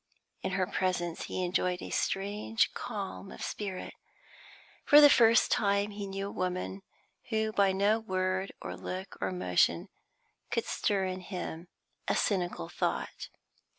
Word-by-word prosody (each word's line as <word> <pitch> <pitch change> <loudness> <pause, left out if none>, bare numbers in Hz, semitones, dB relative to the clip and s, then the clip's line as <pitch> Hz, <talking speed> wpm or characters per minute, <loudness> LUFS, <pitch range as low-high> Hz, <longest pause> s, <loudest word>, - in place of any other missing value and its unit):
In - - -2
her 190 -1 +2
presence 180 -3 -1
he 185 - -3
enjoyed 180 0 0
a - - -7
strange 205 +3 0
calm 195 -1 -5
of - - -8
spirit. 195 -3 -4 0.9
For 295 - +8
the 290 -1 +9
first 230 -1 +5
time 200 0 +2
he 205 -1 -5
knew 195 0 -4
a 200 - -5
woman 185 +1 -3 0.5
who 220 -1 0
by 200 -2 +3
no 200 +3 +2
word 185 -2 -1
or - - -5
look 185 +1 -6
or 95 - 0
motion 90 -2 +1 0.6
could - - -1
stir 195 -2 0
in 185 0 -3
him 180 -2 -6 0.4
a - - +2
cynical 175 - 0
thought. - - -3
190 Hz, 145 wpm, -30 LUFS, 185-205 Hz, 0.9 s, the